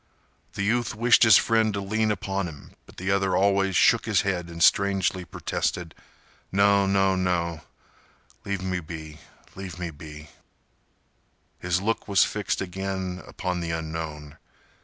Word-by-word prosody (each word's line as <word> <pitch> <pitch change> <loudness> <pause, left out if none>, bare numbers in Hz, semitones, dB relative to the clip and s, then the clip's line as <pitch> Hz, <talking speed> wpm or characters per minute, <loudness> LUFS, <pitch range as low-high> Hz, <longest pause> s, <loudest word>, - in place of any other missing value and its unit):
The 100 - -3
youth 120 +2 0
wished 120 +2 +4
his 110 -2 +8
friend 110 -1 +2
to - - -2
lean 110 +3 0
upon 100 -2 -2
him, 75 -4 -11 0.2
but - - -17
the 95 +2 -2
other 95 -1 +1
always 95 -1 +2
shook - - +4
his - - +3
head 90 -3 -2
and 85 -1 -2
strangely 95 -2 +3
protested. 85 -2 -3 0.6
"No—no—no—leave 95 -1 -1
me 90 -1 -1
be—leave 80 +3 -10
me 85 -2 -4
be—" 75 0 -11 1.3
His 90 0 0
look 115 +2 -1
was 100 -2 +4
fixed 105 -1 -2
again 95 -1 -4
upon 90 -1 -3
the 85 -1 -4
unknown. 80 -2 -5
95 Hz, 130 wpm, -25 LUFS, 85-100 Hz, 1.3 s, his